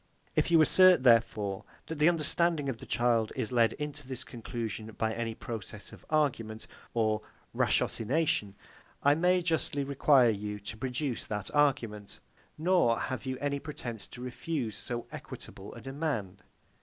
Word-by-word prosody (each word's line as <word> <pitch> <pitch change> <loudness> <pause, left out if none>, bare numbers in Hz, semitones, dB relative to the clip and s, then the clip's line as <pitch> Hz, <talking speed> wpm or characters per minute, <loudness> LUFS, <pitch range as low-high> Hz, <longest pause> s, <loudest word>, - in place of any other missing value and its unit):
If - - +2
you 165 -1 +6
assert, 185 -3 +6
therefore, 115 -5 +3 0.2
that 160 -2 -6
the 155 +3 +6
understanding 165 -2 +1
of 120 -4 -4
the - - -10
child 120 -2 +2
is 110 - -2
led 115 -2 +3
into 145 -2 -4
this 130 -1 -4
conclusion 115 -3 -5
by 110 0 0
any 115 -1 -3
process 110 -3 -7
of - - -13
argument 120 -8 0 0.3
or 110 -2 +2 0.3
ratiocination, 115 -5 +1 0.5
I 145 - +6
may 180 +3 +3
justly 160 -4 0
require 135 -3 +4
you 105 0 -4
to 105 +2 -7
produce 130 +1 -2
that 105 -2 -4
argument; 120 -8 +1 0.4
nor 165 -8 +3
have 130 -1 -4
you 130 0 -2
any 140 0 -1
pretence 120 -8 -7
to 125 - -11
refuse 125 -3 -3
so 120 +3 -5
equitable - - -9
a - - -9
demand. 135 - -3
125 Hz, 150 wpm, -30 LUFS, 110-150 Hz, 0.5 s, you